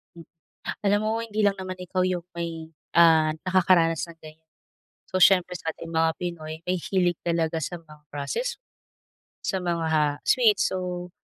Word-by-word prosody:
Hmm, 170 - -11 0.6
alam 205 +1 +4
mo 220 +1 0
hindi 215 -2 -2
lang 200 -1 +2
naman 185 0 -5
ikaw 180 0 -3
yung 180 -2 -2
may, 165 -1 -5 0.2
ah, 160 -2 +5
nakakaranas 180 -3 +3
ng 165 -1 -14
ganyan, 160 +1 -14 0.6
so - - -3
siyempre 180 -1 +5
sating 165 0 -6
mga 160 0 +2
Pinoy 160 -3 -5
mahihilig 180 -1 +1
talaga 165 -1 0
sa 175 +2 -5
mga 150 -2 -17
process, 310 - -3 0.8
sa 190 - -1
mga 160 -4 0
sweets, 215 -5 +3
so 180 -1 -4
170 Hz, 145 wpm, -25 LUFS, 160-185 Hz, 0.8 s, ah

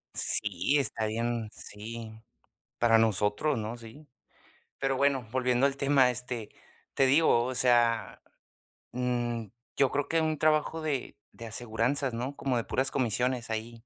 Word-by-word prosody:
Sí, 105 +6 +1
está 115 -4 -1
bien 115 0 -2
sí, 110 +1 -9 0.6
para 115 -1 +5
nosotros, 110 +6 +1
¿no? 110 +2 -4
Sí. 115 +7 -13 0.7
Pero 135 -1 0
bueno, 140 -3 +2
volviendo 125 0 +2
al 140 0 0
tema, 135 -2 +4
este, 125 -3 -5 0.5
te 135 - +4
digo, 130 -4 +4
o 130 0 -3
sea, 120 -2 +2 0.7
mm, 120 -2 -1 0.3
yo 135 -2 +3
creo 145 0 -1
que 165 0 +2
un 155 -2 0
trabajo 155 +1 +2
de 145 -5 -3 0.2
de 115 - -9
aseguranzas, 120 +4 -1
¿no? 125 +5 -4
Como 130 -3 -1
de 115 - -1
puras 130 +7 0
comisiones 125 0 -1
ahí. 115 +1 -4
120 Hz, 145 wpm, -29 LUFS, 115-135 Hz, 0.7 s, para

